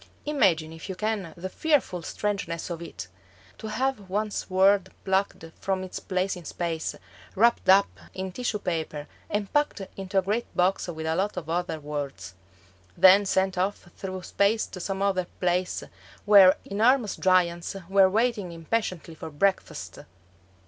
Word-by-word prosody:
Imagine 180 - +2
if 165 +4 -10
you 190 - -3
can 205 -3 -2
the 180 +2 -4
fearful 260 - 0
strangeness 180 -2 -3
of 170 -1 -5
it! 165 - -7 0.5
To - - -6
have 225 -3 -2
one's 210 +2 -2
world 190 0 +4 0.2
plucked 190 -3 0
from 190 -1 -1
its 185 - -6
place 185 +1 -1
in 180 - -10
space, 165 0 -3 0.4
wrapped 230 -2 +3
up 195 +1 +5
in 190 0 -5
tissue 245 +1 -2
paper, 160 -6 -3 0.2
and 205 -1 -2
packed 295 -7 +1
into 195 0 -4
a 190 - +4
great 210 +5 -1
box 185 +2 +2
with 160 -2 -5
a 160 0 0
lot 195 +2 -1
of 160 -2 -4
other 175 -2 -1
worlds; 140 - -5 0.6
then 195 +2 +7
sent 190 -1 +1
off 190 -1 -2
through 185 -1 -6
space 205 +4 +1
to 185 - -9
some 195 +2 -2
other 185 -3 +1
place 180 0 0 0.4
where 200 -2 +8
enormous 225 +2 +2
giants 175 -1 +2
were 195 0 +5
waiting 215 -3 0
impatiently 170 0 -3
for 160 - -8
breakfast! 190 +6 -1
190 Hz, 155 wpm, -26 LUFS, 175-205 Hz, 0.6 s, where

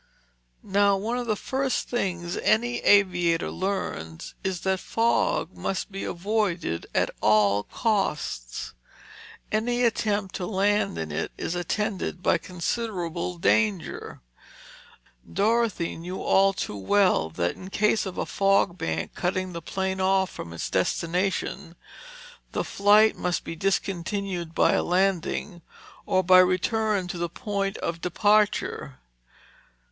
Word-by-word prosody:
Now 200 0 +3
one 230 +5 -2
of 245 - -4
the 215 - +1
first 265 +5 -1
things 180 -7 -2
any 240 +2 +2
aviator 175 -4 +3
learns 135 - -4
is 190 -3 -2
that 190 0 0
fog 235 - 0
must 195 +2 -3
be 195 - -5
avoided 180 - -1
at - - +2
all 105 -1 +4
costs. 150 - -2 0.8
Any 240 +3 +1
attempt 210 -4 0
to 180 - -4
land 205 - +1
in 80 -1 -4
it 75 - -3
is - - -3
attended 180 +1 -2
by 170 - +3
considerable 180 -1 -3
danger. 200 0 0 1.1
Dorothy 215 -3 +1
knew 180 +3 -6
only 195 0 +4
too 105 - -4
well 180 - +2
that 85 +2 -1
in 185 - -10
case 210 +1 +1
of 185 - -7
a - - -1
fog 195 -2 +2
bank 80 0 -2
cutting 185 0 -2
the 170 - -5
plane 190 +2 -2
off 190 0 +2
from 85 - -8
its 85 - -5
destination, 175 -1 -1 0.8
the - - 0
flight 210 +2 +4
must 180 -1 -1
be 165 - -6
discontinued 190 -1 -2
by - - +4
a - - +2
landing, 180 0 0 0.5
or 185 0 +2
by 185 +1 +7
return 190 +2 +2
to 175 - -4
the 170 0 -1
point 200 -1 -3
of 170 0 -4
departure. 205 -7 +1
190 Hz, 130 wpm, -26 LUFS, 170-205 Hz, 1.1 s, by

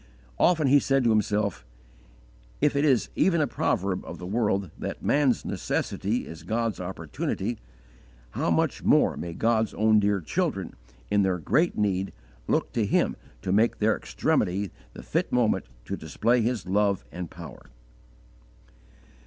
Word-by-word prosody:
Often 165 -4 +4
he 145 +2 +7
said 135 -1 +1
to 115 - +3
himself, 105 - 0 1.0
If 145 0 +2
it 140 - +2
is 135 -6 +3
even 170 -3 +3
a 150 - +3
proverb 100 -7 -1
of 85 - -8
the 90 - -8
world 100 -3 0
that - - -5
"Man's 140 -4 +2
necessity 105 +6 -2
is 80 0 -9
God's 110 +5 -2
opportunity," 90 -4 -3 0.7
how - - -1
much - - +1
more - - +4
may 85 -1 -5
God's 110 -2 +1
own 110 0 +4
dear 100 -1 +2
children 80 - -2 0.4
in 105 - +4
their 95 -2 +1
great 160 - +1
need 95 -2 0 0.3
look - - 0
to - - +1
Him - - +2 0.3
to 95 - -1
make 110 +4 +3
their 110 0 +2
extremity 95 +1 0 0.2
the - - -10
fit - - -1
moment 120 -3 +2 0.2
to - - -3
display 115 +10 +1
His 115 -4 -1
love 100 +1 +1
and 90 -2 -6
power! 85 -1 -11
105 Hz, 150 wpm, -26 LUFS, 95-120 Hz, 1.0 s, he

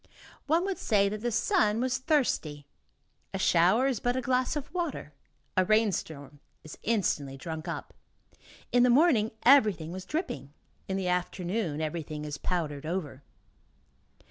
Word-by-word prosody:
One 330 +5 +2
would 390 -1 -3
say 200 -3 +2
that 210 +1 -5
the 240 +1 -1
sun 230 - +2
was 255 +1 0
thirsty. 235 - 0 0.7
A - - 0
shower 190 +6 +4
is 265 -6 0
but 245 +3 0
a 260 - 0
glass 255 +3 0
of 295 +1 -5
water; 345 -4 -3 0.4
a 185 - +4
rainstorm 175 -9 0 0.2
is 155 - -11
instantly 155 -11 -1
drunk 160 +4 -6
up. 170 - -5 0.8
In 245 - +4
the 250 - +5
morning 245 -5 +4
everything 210 - +5
was 185 +1 -7
dripping, 150 - -4 0.3
in 190 - -2
the 190 -2 -2
afternoon 180 -1 -2
everything 155 -1 -4
is 145 -2 -5
powdered 155 -5 -3
over. 160 -6 -4
195 Hz, 145 wpm, -29 LUFS, 160-250 Hz, 0.8 s, the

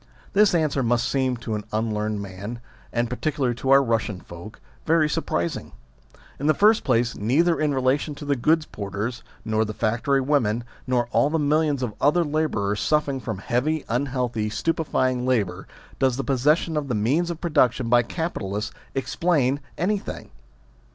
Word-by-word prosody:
This 205 -2 +4
answer 155 -4 +1
must 120 -1 +1
seem 130 -2 0
to 115 -1 -5
an 105 -1 -3
unlearned 110 -1 -1
man, 100 +5 -7 0.3
and 120 0 0
particularly 130 0 -1
to 130 - -3
our 135 0 +7
Eussian 110 -6 -1
folk, 85 +6 -10 0.2
very 160 -1 +3
surpris 85 - -1
ing. - - -9 0.7
In 145 - -1
the 155 - +4
first 215 +2 +4
place, 120 -3 +1
neither 155 +11 +2
in 150 -1 +1
relation 135 +3 +1
to 145 - -8
the 140 0 +1
goods 155 +5 +2
porters 105 +3 -4 0.2
nor 110 0 +1
the 110 -1 -5
factory 120 +5 +1
women, 125 -5 +1 0.2
nor 125 -1 +2
all 120 +5 +3
the 160 - 0
millions 150 -2 +1
of 115 -4 -2
other 150 +5 +4
labourers 145 -10 -1
suffering 150 -3 +1
from 110 -5 -4
heavy, 130 +10 -1
unhealthy, 125 -3 -1
stupefying 130 -2 0
labour, 100 -7 0 0.3
does 130 -2 +2
the 135 - -1
possession 150 +5 +2
of 145 -2 -2
the 125 - -1
means 140 +12 +1
of 170 -2 -4
production 130 -8 +2
by 120 +1 +5
capi 165 +8 -3
talists 100 +3 -3 0.2
explain 140 -1 +1 0.2
anything. 195 +3 -2
130 Hz, 165 wpm, -24 LUFS, 115-150 Hz, 0.7 s, our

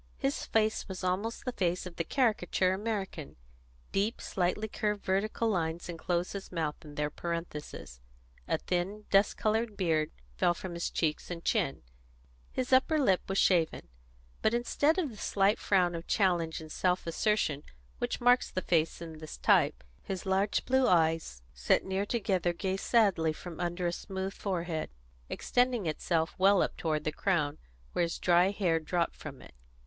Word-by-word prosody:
His 275 0 -1
face 220 -1 +1
was 190 -1 -6
almost 195 +6 -1
the 250 - -1
face 180 -5 -1
of 180 -2 -8
the 165 - 0
caricature 190 - +1
American: 195 -6 -4 0.6
deep, 205 +4 0
slightly 190 +4 -1
curved 210 -1 -2
vertical 205 +4 0
lines 170 -4 -1
enclosed 175 +1 -2
his 200 -1 -7
mouth 160 -4 -1
in 150 -2 -11
their 150 0 -1
parenthesis; 150 - -6 0.5
a - - +1
thin, 190 +4 -2
dust 195 +1 +4
coloured 220 0 0
beard 160 -5 +1 0.3
fell 175 - +3
from 180 0 -6
his 170 0 -2
cheeks 155 -2 -1
and 170 -1 -6
chin; 185 - 0 0.7
his 260 0 -1
upper 275 +5 +4
lip 195 -11 +3
was 195 - 0
shaven. 165 - +2 0.5
But 220 +2 +2
instead 285 +7 +2
of 320 -8 0
the 215 - -12
slight 200 +1 +2
frown 180 -3 +2
of 165 0 -6
challenge 175 -5 +1
and 155 -1 -10
self 180 +2 0
assertion 165 -4 +1 0.4
which - - -2
marks 245 +1 +4
this 185 - -3
face 165 0 +1
in 160 -2 -9
the 155 - -8 0.2
type, - - +4 0.2
his 190 -2 -5
large 195 +2 +1
blue 260 0 +3
eyes, 160 - +2
set 60 -1 +2
near 190 +2 -1
together, 190 -6 0
gazed 190 +2 -2
sadly 195 -9 +3
from 170 +1 -9
under 175 0 -2
a 175 - +1
smooth 190 +1 -4
forehead, 170 -5 -3 0.4
extending 245 -4 +1
itself 160 +1 0
well 195 0 +5
up - - -3
toward 155 -2 -1
the 155 - -1
crown, 155 -3 0 0.3
where - - +1
his 170 -1 0
dry 175 +1 +4
hair 185 -5 +1
dropped 170 +1 -2
over - - -8
it. - - -15
185 Hz, 165 wpm, -31 LUFS, 165-210 Hz, 0.7 s, well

